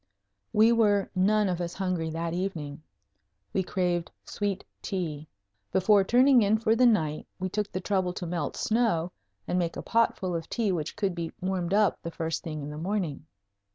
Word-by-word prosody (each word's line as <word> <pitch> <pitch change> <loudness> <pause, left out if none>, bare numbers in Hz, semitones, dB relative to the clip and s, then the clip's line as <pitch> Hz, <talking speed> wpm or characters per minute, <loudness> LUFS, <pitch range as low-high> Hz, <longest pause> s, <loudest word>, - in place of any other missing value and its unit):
We 220 +2 +5
were 210 -4 +3
none 205 +3 +3
of 180 -1 -1
us 175 0 -4
hungry 180 -4 -1
that 165 +1 -3
evening. 165 -5 -4 0.7
We 190 - +2
craved 180 -2 -1 0.2
sweet 200 -2 -3 0.2
tea. 155 -6 -4 0.4
Before 195 +1 +4
turning 250 +4 +5
in 210 +1 +3
for 225 0 +2
the 250 +1 +5
night 155 -10 +1
we 185 0 -3
took 210 +2 -2
the 185 - -3
trouble 185 -2 0
to 180 - -5
melt 170 -4 -3
snow 215 -7 +1 0.4
and 180 - +1
make 170 -2 -2
a - - -5
potful 225 -5 +1
of 165 -1 -4
tea 225 -4 0
which 165 -3 -3
could 200 -3 0
be 170 -1 -4
warmed 185 0 -1
up 210 0 +2
the 170 - -5
first 165 -1 -3
thing 155 -3 -5
in 145 - -5
the 150 - -6
morning. 170 -5 -2
185 Hz, 185 wpm, -28 LUFS, 165-210 Hz, 0.7 s, We